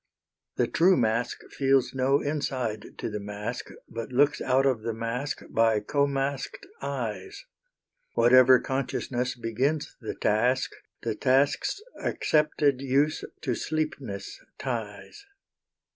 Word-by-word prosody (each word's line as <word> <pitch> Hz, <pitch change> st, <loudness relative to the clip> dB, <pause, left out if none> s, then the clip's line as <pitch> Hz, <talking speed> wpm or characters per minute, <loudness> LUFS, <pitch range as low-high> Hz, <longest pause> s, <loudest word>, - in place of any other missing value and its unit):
The -, -, +2 dB
true 180 Hz, +3 st, +4 dB
mask 115 Hz, 0 st, 0 dB
feels 135 Hz, -2 st, +2 dB
no 135 Hz, +2 st, +2 dB
inside 130 Hz, -7 st, -3 dB
to -, -, -3 dB
the 105 Hz, -2 st, -4 dB
mask 105 Hz, +4 st, -5 dB, 0.2 s
But 115 Hz, +2 st, -6 dB
looks 145 Hz, +3 st, +3 dB
out 130 Hz, +1 st, +2 dB
of 130 Hz, -5 st, +2 dB
the 115 Hz, 0 st, -3 dB
mask 120 Hz, +5 st, -3 dB
by 115 Hz, -1 st, +3 dB
co 140 Hz, +7 st, +1 dB
masked 140 Hz, -, -3 dB, 0.2 s
eyes. 400 Hz, +2 st, -4 dB, 0.7 s
Whatever 130 Hz, +1 st, +7 dB
consciousness 125 Hz, -2 st, -2 dB
begins 130 Hz, +6 st, -1 dB
the -, -, -4 dB
task 125 Hz, +5 st, +1 dB, 0.3 s
The -, -, 0 dB
task's 140 Hz, -, +1 dB, 0.2 s
accepted 150 Hz, -3 st, +2 dB
use 140 Hz, +3 st, +1 dB, 0.2 s
to 130 Hz, -, -1 dB
sleepness 130 Hz, -9 st, -4 dB
ties. 120 Hz, -, -5 dB
130 Hz, 115 wpm, -27 LUFS, 115-140 Hz, 0.7 s, Whatever